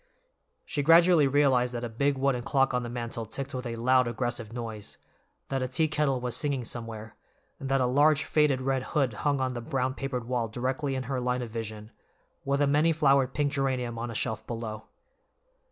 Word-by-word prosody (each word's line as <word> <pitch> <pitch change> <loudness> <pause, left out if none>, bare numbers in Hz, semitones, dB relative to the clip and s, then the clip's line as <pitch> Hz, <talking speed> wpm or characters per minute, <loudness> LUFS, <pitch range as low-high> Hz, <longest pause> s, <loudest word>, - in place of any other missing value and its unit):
She 145 - -2
gradually 165 0 +6
realized 130 -3 +2
that 120 - -4
a - - -1
big 140 +5 0
wooden 135 -2 +1
clock 135 +1 +1
on 125 - +1
the 120 - -5
mantel 115 -1 -4
ticked 135 +5 -6
with 125 -1 -4
a 115 - -4
loud, 125 +2 +3
aggressive 120 -1 -3
noise, 115 -3 -6 0.5
that 135 -1 -1
a 130 - -1
teakettle 145 0 +1
was 125 -1 -2
singing 140 -5 -1
somewhere, 110 -2 -5 0.4
and 135 - -5
that 135 0 +2
a - - +3
large 145 +4 +3
faded 150 -4 +2
red 135 0 0 0.2
hood 135 -5 +2
hung 140 +6 0
on 130 -1 -1
the 120 - -5
brown 130 0 -1
papered 135 -3 -4
wall 120 -1 -1
directly 130 +5 -2
in 130 - -2
her 130 0 -3
line 125 0 -1
of 115 - -7
vision, 110 -1 -6 0.5
with 140 +1 0
a - - +5
many 150 +4 +3
flowered 140 -4 +3
pink 145 -1 +1
geranium 130 -4 -1
on 120 +1 -4
a 115 - -6
shelf 110 +1 -2
below. 115 -2 -5
130 Hz, 200 wpm, -28 LUFS, 120-140 Hz, 0.5 s, gradually